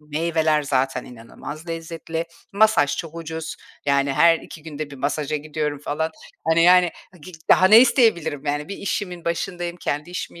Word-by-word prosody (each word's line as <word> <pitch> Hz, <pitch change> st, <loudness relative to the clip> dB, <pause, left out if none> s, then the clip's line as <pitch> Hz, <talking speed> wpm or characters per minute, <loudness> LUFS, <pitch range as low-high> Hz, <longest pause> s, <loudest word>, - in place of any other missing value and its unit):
meyveler 155 Hz, 0 st, 0 dB
zaten 135 Hz, -2 st, 0 dB
inanılmaz 145 Hz, +7 st, -10 dB
lezzetli. 165 Hz, 0 st, -4 dB, 0.3 s
Masaj 200 Hz, -8 st, +3 dB
çok 165 Hz, -2 st, -6 dB
ucuz. 160 Hz, -1 st, -6 dB, 0.3 s
Yani, 140 Hz, 0 st, +2 dB
her 165 Hz, +3 st, +5 dB
2 155 Hz, -, -12 dB
günde 155 Hz, -2 st, -6 dB
1 140 Hz, -, -9 dB
masaja 145 Hz, +2 st, -2 dB
gidiyorum 150 Hz, -1 st, -3 dB
falan. 155 Hz, +3 st, -2 dB, 0.4 s
Hani, 165 Hz, +1 st, +4 dB
yani, 180 Hz, 0 st, +6 dB, 0.2 s
ha 180 Hz, -, -17 dB
gi 185 Hz, +5 st, -12 dB, 0.2 s
daha 185 Hz, -, +7 dB
ne 220 Hz, +3 st, +9 dB
isteyebilirim 220 Hz, -, +2 dB
yani? 145 Hz, +3 st, -2 dB
Bir 200 Hz, -, -5 dB
işimin 180 Hz, -3 st, -4 dB
başındayım, 175 Hz, 0 st, -3 dB
kendi 150 Hz, -1 st, -3 dB
işimi 175 Hz, -1 st, -6 dB
160 Hz, 160 wpm, -22 LUFS, 145-170 Hz, 0.4 s, ne